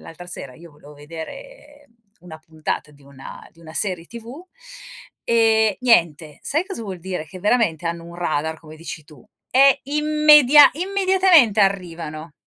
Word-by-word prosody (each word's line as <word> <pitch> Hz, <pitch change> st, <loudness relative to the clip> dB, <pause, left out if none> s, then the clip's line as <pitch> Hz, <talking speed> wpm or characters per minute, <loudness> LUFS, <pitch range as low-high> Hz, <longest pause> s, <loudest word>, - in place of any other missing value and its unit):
l'altra 175 Hz, +2 st, -12 dB
sera 140 Hz, -7 st, -9 dB
io 170 Hz, -1 st, -16 dB
volevo 150 Hz, 0 st, -17 dB
vedere 290 Hz, -, -12 dB, 0.3 s
una 165 Hz, -3 st, -12 dB
puntata 155 Hz, -1 st, -6 dB
di 145 Hz, -1 st, -22 dB
una 140 Hz, -1 st, -13 dB
di 165 Hz, -, -23 dB
una 160 Hz, -1 st, -13 dB
serie 180 Hz, -4 st, -2 dB
tv, 235 Hz, +8 st, -11 dB, 0.8 s
e 220 Hz, -3 st, +2 dB
niente. 165 Hz, -, +1 dB
Sai 315 Hz, +6 st, -1 dB
cosa 385 Hz, -, -7 dB
vuol 190 Hz, -4 st, -7 dB
dire? 180 Hz, -3 st, -5 dB
Che 185 Hz, -, -12 dB
veramente 205 Hz, -7 st, 0 dB
hanno 170 Hz, 0 st, -5 dB
un 170 Hz, 0 st, -12 dB
radar, 160 Hz, -2 st, -3 dB
come 155 Hz, -1 st, -14 dB
dici 160 Hz, -1 st, -8 dB
tu, 150 Hz, 0 st, -18 dB, 0.3 s
e 270 Hz, +1 st, +4 dB
immedia 300 Hz, -1 st, +5 dB
immediatamente 370 Hz, -, +2 dB
arrivano. 165 Hz, -6 st, -3 dB
180 Hz, 150 wpm, -20 LUFS, -, 0.8 s, immedia